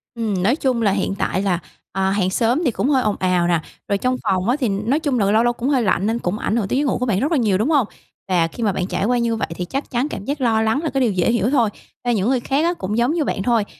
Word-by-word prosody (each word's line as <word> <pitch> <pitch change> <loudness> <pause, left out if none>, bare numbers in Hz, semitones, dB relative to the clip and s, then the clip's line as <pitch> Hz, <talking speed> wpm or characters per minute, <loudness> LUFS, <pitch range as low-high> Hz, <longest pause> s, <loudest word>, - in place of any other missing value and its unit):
Ừm, 210 -6 -1
nói 240 +8 +3
chung 255 -6 0
là 205 - +3
hiện 195 0 -1
tại 190 -1 -1
là, 190 -4 0 0.3
ờ, 190 0 0
hàng 195 -1 +1
xóm 235 - +1
thì 255 - +3
cũng 255 - -1
hơi 270 -3 +3
ồn 210 -3 0
ào 180 -2 +2
nè. 170 -2 +2 0.3
Rồi 200 - +1
trong 255 +5 0
phòng 190 +3 0
á, 255 - +3
thì 250 -5 +1
nói 215 +9 0
chung 285 -6 0
là 200 -1 +2
lâu 220 +2 +4
lâu 240 - +2
cũng 240 +3 -2
hơi 270 -4 +2
lạnh 200 -2 +1
nên 230 +2 0
cũng 185 +2 -2
ảnh 215 - -1
hưởng 210 -5 0
tới 255 - 0
giấc 295 - +1
ngủ 270 - +1
của 250 - -1
bạn 200 -5 +1
rất 290 +8 0
là 320 - +3
nhiều, 210 -6 +2
đúng 220 +9 0
hông? 280 -9 +3 0.4
Và 175 -3 +3
khi 230 +8 -6
mà 210 - +2
bạn 185 -1 -2
trải 200 - -1
qua 245 +1 +2
như 235 -1 0
vậy, 220 - -2
thì 180 - -4
chắc 270 +10 -4
chắn 250 +4 -1
cảm 200 - -6
giác 285 +2 -3
lo 225 -3 +2
lắng 225 +7 +1
là 320 - 0
cái 270 -1 -1
điều 235 -4 +3
dễ 185 +4 +1
hiểu 235 0 +1
thôi. 245 -6 +3 0.4
Và 245 - +2
những 215 0 +1
người 260 -1 +2
khác 275 +5 0
á, 345 - +2
cũng 210 - -3
giống 240 +5 +2
như 330 -3 +1
bạn 195 - -2
thôi. 230 -3 +2
230 Hz, 320 wpm, -20 LUFS, 195-255 Hz, 0.4 s, lâu